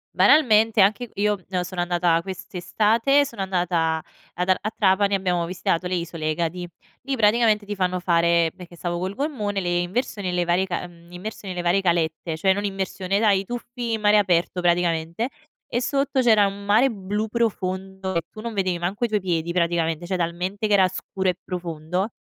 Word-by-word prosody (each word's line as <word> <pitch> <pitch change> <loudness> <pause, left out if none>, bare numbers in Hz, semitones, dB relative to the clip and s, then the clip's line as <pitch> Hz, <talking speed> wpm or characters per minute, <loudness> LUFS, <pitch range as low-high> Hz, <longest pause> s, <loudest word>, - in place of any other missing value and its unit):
Banalmente, 225 -7 +5
anche 215 +4 +2
io, 205 0 +1
mhmm, 180 -2 -1
sono 180 0 -4
andata 175 -1 +2
quest'estate 220 +8 +1
sono 225 -7 -5
andata 175 -4 0 0.3
ad 180 +2 -2
a 185 - +4
a 215 - -3
Trapani, 200 0 +3
abbiamo 180 -3 0
visitato 175 0 -1
le 180 - -2
isole 165 -2 -3
Egadi. 170 +2 -3 0.4
Lì 275 - -2
praticamente 215 -1 +3
ti 205 - -3
fanno 185 -1 0
fare 170 -1 +2
perché 180 -2 -12
stavo 175 0 -3
col 185 +2 -3
gommone, 220 -7 -2
le 175 -1 0
inversioni 200 +1 -2
e - - -1
le 180 0 0
varie 175 +2 +2
ca 180 -1 -4
mhmm, 170 0 -18
immersioni 190 +1 -7
e - - -9
le 175 - -1
varie 175 +3 +2
calette, 165 -2 0
cioè 190 +3 +3
non 205 +1 -3
immersione 195 0 -2
dai 205 -3 +3
i - - -11
tuffi 240 +1 -5
in 220 - -2
mare 210 0 +5
aperto 180 -2 +1
praticamente. 170 +3 +1 0.4
E 240 - +1
sotto 275 +1 0
c'era 220 -4 +5
un 200 +1 -7
mare 220 +6 +4
blu 210 0 -3
profondo, 190 -4 -2
e 170 - +2
tu 215 - -9
non 230 -1 -5
vedevi 185 -3 0
manco 195 +7 -1
i - - 0
tuoi 215 -2 0
piedi, 170 -2 -1
praticamente, 170 -1 0
cioè 185 0 -1
talmente 180 +5 -2
che 210 - +1
era 190 -2 +5
scuro 190 +1 -3
e 180 - 0
profondo. 175 +2 -3
190 Hz, 195 wpm, -23 LUFS, 175-210 Hz, 0.4 s, Banalmente